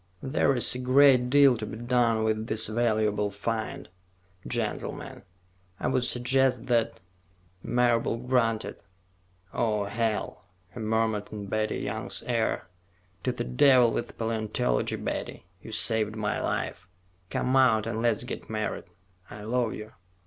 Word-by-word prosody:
There 135 0 +1
is 120 - +5
a 125 - -4
great 130 -1 +5
deal 140 -1 +6
to 110 - -6
be 110 - -6
done 120 -2 +1
with 110 0 -1
this 110 -1 0
valuable 110 -2 +1
find, 110 +6 -4 0.6
gentlemen. - - -4 0.6
I - - -1
would 130 -2 +1
suggest 125 0 +1
that 115 -2 0 0.4
" 90 0 -36 0.2
Marable 120 -1 +2
grunted. 115 -2 0 0.8
"Oh, 105 -3 0
hell," 110 +1 -3 0.3
he - - -8
murmured 110 -1 0
in 105 -2 -6
Betty 110 +2 -1
Young's 100 0 -2
ear. 115 -2 0 0.6
"To - - +2
the - - -4
devil 120 - +5
with 120 - -4
paleontology, 110 - -1
Betty. - - -5 0.2
You 110 - -10
saved 110 -1 +2
my 105 -2 -2
life. 90 - -3 0.4
Come 130 +1 0
out 115 -5 +4
and 110 - -3
let's 120 -1 +1
get 125 - -7
married. 110 -1 -3 0.4
I 105 0 -9
love 120 +1 -1
you." 105 0 -9
115 Hz, 140 wpm, -27 LUFS, 110-125 Hz, 0.8 s, deal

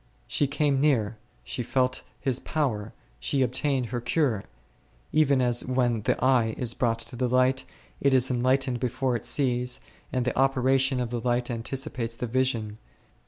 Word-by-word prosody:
She 145 - +1
came 145 -1 +1
near, 115 -7 +1 0.2
she 125 - -4
felt 125 +1 0 0.2
His 130 -2 0
power, 115 -9 -2 0.3
she 130 - +1
obtained 130 +1 0
her 120 -1 -3
cure; 120 -5 +1 0.7
even 140 -4 +3
as 120 -1 +2
when 125 -3 +1
the 105 - +1
eye 120 -4 +3
is 120 -2 0
brought 115 -2 +1
to 115 +2 -6
the 125 0 0
light, 130 +1 +2 0.3
it 140 - +3
is 130 0 +3
en 120 -1 0
lightened 130 -1 +2
before 125 +1 0
it 115 - -3
sees, 125 -3 +1 0.3
and 125 -2 0
the 125 - -1
operation 135 0 +2
of 120 -2 -2
the 120 -1 -2
light 120 0 0
anticipates 120 -1 -3
the 125 - -3
vision. 115 -3 -1
125 Hz, 165 wpm, -27 LUFS, 120-135 Hz, 0.7 s, even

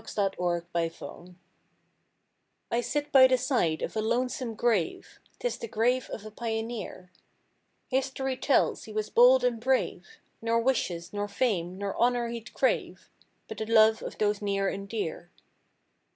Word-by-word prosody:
THE 200 -2 -1
GRAVE 175 -1 -1
I'D 165 -1 0
HAVE 180 +1 -11 1.4
I 235 - +1
sit 290 +4 -2
by 260 -1 +8
the 255 0 +3
side 245 - 0
of - - -4
a 215 - 0
lonesome 245 +1 -1
grave— 220 -7 -1 0.2
'Tis - - -3
the 465 - -5
grave 245 - 0
of 215 - -7
a 215 - -8
pioneer; 225 -4 -5 0.8
History 265 0 -1
tells 275 - +1
he 215 - -10
was 215 0 -3
bold 250 +2 +6
and 245 -2 +1
brave; 260 - 0 0.3
Nor 230 0 +1
wishes, 215 -9 -1
nor 205 0 -2
fame, 195 -5 -1
nor 200 0 -3
honor 240 0 +2
he'd 235 0 -7
crave; - - -1 0.4
But - - -7
the 220 - -3
love 220 -1 +5
of - - -7
those 210 -1 0
near 195 -1 0
and 195 +1 -4
dear. 175 -5 -4
225 Hz, 155 wpm, -28 LUFS, 200-250 Hz, 1.4 s, by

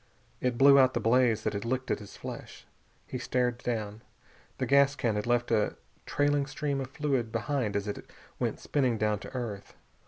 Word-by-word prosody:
It 125 -2 -1
blew 140 +2 +8
out 130 -1 +4
the - - +2
blaze 115 -1 +3
that - - -1
had 100 0 -3
licked 130 +2 -2
at - - 0
his 105 - -11
flesh. - - -8 0.4
He 130 - -5
stared 125 -1 0
down. 110 -3 -3 0.6
The - - -1
gas 140 0 +4
can 120 -5 0
had 105 +2 -2
left 120 0 +1
a 110 -2 +2 0.3
trailing 145 -1 +1
stream 140 0 -2
of 130 - -5
fluid 130 -5 -1
behind 115 -1 -1
it - - +4
as 100 +1 -3
it 105 - -6 0.3
went - - -1
spinning 130 -5 0
down 105 -1 +1
to 130 - -10
earth. 110 -6 -5
120 Hz, 195 wpm, -29 LUFS, 110-135 Hz, 0.6 s, blew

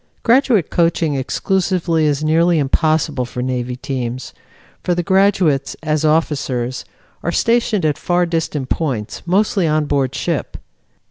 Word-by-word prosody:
Graduate 235 - +3
coaching 165 -2 +1
exclusively 170 +3 0
is 145 0 0
nearly 165 +2 +3
impossible 155 -1 +1
for 125 0 -5
Navy 125 -1 -2
teams, 125 -2 -5 0.5
for 175 - 0
the 175 - -1
graduates, 190 -7 +2
as 155 -1 0
officers, 140 -6 0 0.4
are 170 - -1
stationed 230 -4 +1
at 150 -2 0
far 175 0 +1
distant 160 -5 -2
points, 125 -10 -2
mostly 195 -1 +2
on 155 0 +1
board 135 -2 0
ship. 165 +2 -3
155 Hz, 130 wpm, -18 LUFS, 135-175 Hz, 0.5 s, Graduate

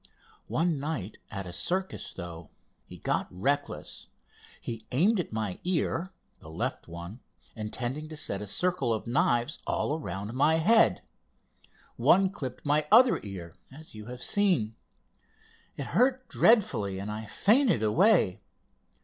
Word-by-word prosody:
One 165 -2 0
night 135 - -4
at 100 -2 -5
a 90 - -7
circus, 190 - -2
though, 85 -3 -8 0.4
he - - -10
got - - -1
reckless. 140 +11 -2 0.5
He 115 -2 -6
aimed 190 - +3
at 175 - -3
my 110 -4 -3
ear—the 180 - -3
left 80 - -4
one—intending 105 - -7
to 155 - -7
set 100 -8 -2
a 105 - -6
circle 155 - 0
of 110 - -6
knives 120 +2 +1
all - - 0
around 100 - -5
my 145 +5 +3
head. 220 +8 +4 0.9
One 190 0 +4
clipped 130 -8 -7
my 150 +1 +2
other 245 +3 +7
ear, 90 -5 -8 0.2
as 155 +4 -12
you 105 0 -10
have 125 0 -6
seen. 180 - +2 1.0
It 140 - -4
hurt 255 +1 +2
dreadfully, 115 - +3
and 100 +2 -4
I 110 +1 -6
fainted 215 - +3
away. 165 - +3
130 Hz, 130 wpm, -29 LUFS, -, 1.0 s, other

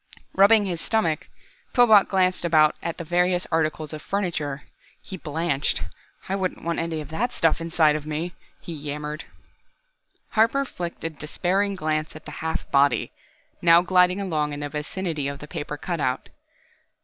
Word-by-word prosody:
Rubbing 205 +2 +6
his 175 -4 -3
stomach, 190 -9 0 0.5
Pillbot 220 -5 +6
glanced 185 -2 +1
about 155 -3 +4
at 170 - -4
the - - -5
various 180 +2 +1
articles 155 -1 0
of 155 - -6
furniture. 160 -8 -2 0.4
He 190 - -8
blanched. 150 - -1 0.4
"I 195 - -1
wouldn't 190 -2 -3
want 170 0 -1
any 165 -1 -2
of 150 - -9
that 230 +10 -1
stuff 165 -6 +1
inside 165 -2 +3
of 155 0 -5
me," 160 +3 -3 0.3
he 170 - -7
yammered. 150 0 -5 1.1
Harper 230 +6 +3
flicked 175 -8 -6
a 165 - -2
despairing 185 +7 -1
glance 155 -3 -2
at 155 - -11
the 150 - -7
half 160 0 -3
body, 140 0 +3 0.5
now 170 0 +6
gliding 180 +1 +4
along 155 -6 -1
in 145 - -5
the 145 - -3
vicinity 150 0 -3
of 140 0 -4
the 150 - -10
paper 150 0 -5
cutout. 145 -6 -2
165 Hz, 160 wpm, -24 LUFS, 150-185 Hz, 1.1 s, Rubbing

